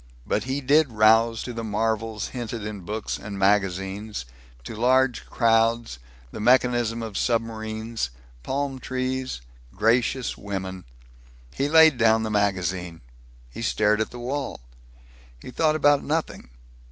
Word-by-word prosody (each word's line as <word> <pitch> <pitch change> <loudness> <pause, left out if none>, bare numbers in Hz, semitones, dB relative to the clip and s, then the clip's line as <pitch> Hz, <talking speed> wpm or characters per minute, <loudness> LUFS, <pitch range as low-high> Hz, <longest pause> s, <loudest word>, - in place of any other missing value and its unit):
But - - -1
he 135 +2 -2
did 145 +1 +3
rouse 115 +1 +4
to 125 - -6
the 115 0 -5
marvels 110 0 -2
hinted 115 -3 -5
in 105 -1 -5
books 105 +4 -4
and 100 -1 -7
magazines; 95 - 0 0.4
to 65 - -7
large 125 +2 +2
crowds, 115 - +2 0.3
the - - -7
mechanism 120 -1 +2
of 110 -3 -7
submarines, 110 - -2 0.3
palm 135 - -3
trees, 130 - -3 0.3
gracious 115 +4 +1
women. 95 -2 -6 0.7
He 140 +1 -1
laid 160 -4 +6
down 110 -1 +4
the 110 - -3
magazine. 90 - -1 0.5
He 65 - -8
stared 105 -1 +2
at 110 - -1
the 125 - -10
wall. 130 - -4 0.8
He 130 - -10
thought 155 +3 +2
about 145 -2 +3
nothing. 155 - -3
115 Hz, 130 wpm, -24 LUFS, 105-130 Hz, 0.8 s, laid